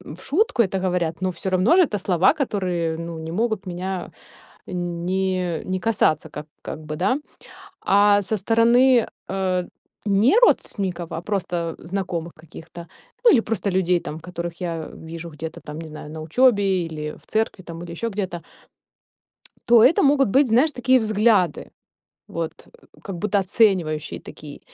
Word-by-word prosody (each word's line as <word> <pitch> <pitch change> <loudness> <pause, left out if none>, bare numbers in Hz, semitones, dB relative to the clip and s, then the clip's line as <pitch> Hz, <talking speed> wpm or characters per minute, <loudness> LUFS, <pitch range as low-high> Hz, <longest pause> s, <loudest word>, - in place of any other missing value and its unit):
в 180 - -14
шутку 305 - +2
это 190 -2 -2
говорят, 180 -3 -1
но 185 - 0
всё 180 +2 -4
равно 185 - +3
ж - - +5
это 290 - +3
слова, 185 +2 +3
которые, 180 - -1
ну, 165 0 -6
не 160 0 -6
могут 215 +1 -1
меня 180 0 -4 0.6
не 180 0 -2
не 185 0 -2
касаться 185 -7 +1
ка 150 - -7 0.2
как - - -6
бы, 155 0 -5
да? 195 - +1 0.7
А 205 +1 +4
со 205 +3 -2
стороны, 235 +4 +4 0.2
э, 185 -2 -1 0.4
не 210 - +4
родственников, 185 - +1
а - - -4
просто 175 -4 -2
знакомых 170 -2 -4
каких-то, 165 +1 -12 0.4
ну 470 - +9
или 240 - +5
просто 210 -3 -2
людей 180 -1 +2
там, 155 0 -7
которых 170 0 -6
я 165 -2 -4
вижу 165 +1 -8
где-то 160 +1 -7
там, 150 +1 -8
не 165 - -8
знаю, 150 -1 -9
на 160 0 -7
учёбе 195 - +2
или 150 -2 -6
в - - -25
церкви 220 -4 -1
там, 170 0 -8
или 170 - -8
еще 200 +7 -3
где-то 190 -5 -4 1.2
то 235 -2 +6
это 265 +8 +5
могут 275 -2 +4
быть, 265 +6 +3
знаешь, 255 +8 +3
такие 255 0 +3
взгляды. 210 -6 +2 0.6
Вот 165 -1 -3 0.5
как 195 -4 -6
будто 205 +1 +1
оценивающие 180 -6 +1
такие. 150 -1 -11
185 Hz, 160 wpm, -22 LUFS, 170-215 Hz, 1.2 s, ну